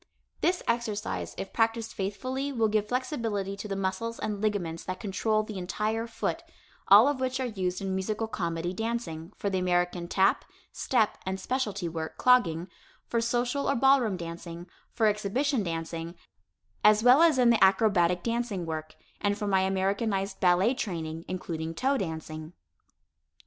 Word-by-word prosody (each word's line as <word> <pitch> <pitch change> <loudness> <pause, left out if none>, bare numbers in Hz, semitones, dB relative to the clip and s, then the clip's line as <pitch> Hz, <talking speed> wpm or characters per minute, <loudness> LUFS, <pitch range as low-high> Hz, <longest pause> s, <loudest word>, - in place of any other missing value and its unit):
This 360 +1 +1
exercise 230 -3 -2
if 195 - -6
practiced 225 0 0
faithfully 255 +8 -3
will 225 -5 +1
give 210 0 +1
flexibility 225 -6 -2
to 200 - -7
the 195 - -3
muscles 195 +5 -2
and 210 -2 -3
ligaments 180 -6 -1
that 185 0 -4
control 215 +2 0
the 210 -2 -6
entire 215 +5 -2
foot, 230 - -3 0.5
all 210 +6 +8
of 290 -2 0
which 260 0 -1
are 260 - 0
used 185 -6 -2
in 195 -1 -2
musical 210 +4 -2
comedy 170 -3 -3
dancing, 200 -6 -4
for 200 - -2
the 190 - +1
American 175 -1 0
tap, 190 +2 +2 0.3
step 225 -5 +1
and 190 0 -3
specialty 210 -8 -2
work 160 -1 -5
(clogging), 180 -10 +3 0.4
for 235 - +1
social 245 +4 0
or 280 - +2
ballroom 250 -6 +4
dancing, 170 0 -7 0.3
for 225 - +1
exhibition 215 +6 +1
dancing, 165 -1 -4 0.7
as 210 +1 +6
well 250 +5 +7
as 330 -4 +5
in 245 -2 +5
the 230 - +4
acrobatic 190 -3 +3
dancing 230 -6 -2
work, 155 -1 -5 0.2
and 205 0 0
for 210 - -3
my 195 -2 +3
Americanized 195 +1 0
ballet 185 +6 +4
training, 165 -8 -4
including 165 -3 -4
toe 270 +9 +1
dancing. 160 - -5
205 Hz, 155 wpm, -28 LUFS, 180-230 Hz, 0.7 s, all